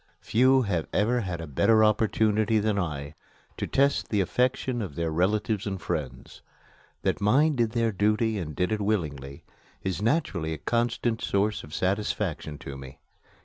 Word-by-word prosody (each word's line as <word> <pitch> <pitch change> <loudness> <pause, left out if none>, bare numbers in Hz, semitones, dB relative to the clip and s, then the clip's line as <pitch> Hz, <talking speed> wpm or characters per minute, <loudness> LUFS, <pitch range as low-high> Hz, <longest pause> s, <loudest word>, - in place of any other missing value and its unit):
Few 130 +3 +3
have 90 -7 -1
ever 115 +5 +2
had 90 -6 -4
a - - -5
better 110 - +3
opportunity 110 0 +2
than 105 -1 +1
I 75 -5 -4 0.4
to - - -3
test 140 +1 +1
the 105 - +1
affection 125 +4 0
of 95 -9 -5
their 85 -1 -1
relatives 100 +5 0
and 95 -1 -3
friends. 75 -9 -5 0.6
That - - 0
mine 140 +9 +3
did 115 -3 0
their 115 -2 +1
duty 105 +2 +1
and 75 -5 -5
did 90 0 0
it 110 -1 -1
willingly 75 -10 -2 0.4
is 95 0 -2
naturally 105 - 0
a - - -5
constant 120 +4 -1
source 100 +2 0
of 75 - -12
satisfaction 95 -5 -2
to 70 -1 -8
me. 65 -1 -10
105 Hz, 160 wpm, -27 LUFS, 85-115 Hz, 0.6 s, Few